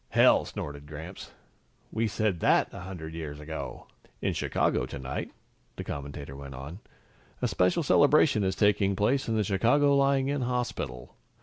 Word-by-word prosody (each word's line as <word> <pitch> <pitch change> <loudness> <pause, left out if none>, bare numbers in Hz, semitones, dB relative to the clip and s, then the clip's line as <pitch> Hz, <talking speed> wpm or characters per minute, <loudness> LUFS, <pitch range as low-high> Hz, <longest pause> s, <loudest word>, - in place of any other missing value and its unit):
"Hell!" - - +5
snorted 75 0 -7
Gramps. 80 +5 -8 0.6
"We 115 +1 0
said 105 -4 0
that - - +3
a - - -7
hundred 90 -4 -7
years 75 -3 -6
ago!" 80 +1 -6 0.3
"In - - 0
Chicago - - 0
tonight," 65 -1 -5 0.5
the - - -5
commentator 70 -1 -6
went 70 -1 -8
on, 70 +8 -8 0.6
"a - - +1
special 90 - +2
celebration 145 -5 +4
is 95 0 0
taking 100 -2 +3
place 125 +7 +1
in 115 - +1
the 110 - +2
Chicago 120 +9 +3
Lying 135 -1 +3
in 140 -1 -1
Hospital. 120 - -3
95 Hz, 150 wpm, -28 LUFS, 75-120 Hz, 0.6 s, Hell